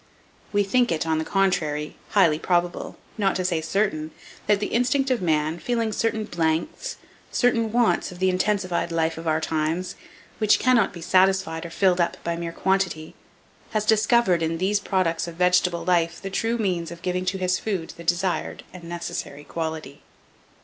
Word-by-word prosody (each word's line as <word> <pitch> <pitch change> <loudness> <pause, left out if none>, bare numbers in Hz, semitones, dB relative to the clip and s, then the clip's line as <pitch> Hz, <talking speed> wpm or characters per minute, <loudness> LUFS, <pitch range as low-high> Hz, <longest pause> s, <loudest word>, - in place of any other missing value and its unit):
We 205 -1 +3
think 245 +4 +2
it, 165 -1 0
on 160 -1 +1
the - - -1
contrary, 160 -6 0
highly 170 -7 +4
probable, 175 0 -1 0.2
not 195 -2 +2
to 185 - -1
say 170 -3 0
certain, 160 -4 -1 0.4
that 205 -1 +4
the 205 - -1
instinct 255 +3 +2
of 250 - +1
man, 155 -1 0
feeling 230 0 -1
certain 220 0 -1
blanks, 165 - -2 0.3
certain 230 -3 +2
wants 235 -4 +2
of 180 - -10
the 185 +1 +2
intensified 185 -2 0
life 165 -1 0
of 165 - -7
our 155 0 +2
times, 160 +3 -1 0.5
which 215 -1 +4
cannot 245 -5 +3
be 170 - -10
satisfied 185 -2 +2
or - - -10
filled 180 +1 +2
up 170 - 0
by 170 0 -1
mere 170 0 -4
quantity, 190 -4 -1 0.6
has 215 -1 0
discovered, 215 -4 +3
in 165 0 0
these 195 +4 +1
products 180 -5 0
of 170 - -7
vegetable 180 -1 +2
life 170 -1 +1
the 195 - -6
true 225 +4 0
means 180 -6 -1
of 170 0 -10
giving 180 0 -1
to 190 +1 -1
his 185 -1 0
food 190 -7 -3
the 170 - -10
desired 175 +2 -1
and 180 -2 -10
necessary 170 -4 -5
quality. 160 -3 -5
180 Hz, 175 wpm, -24 LUFS, 165-205 Hz, 0.6 s, highly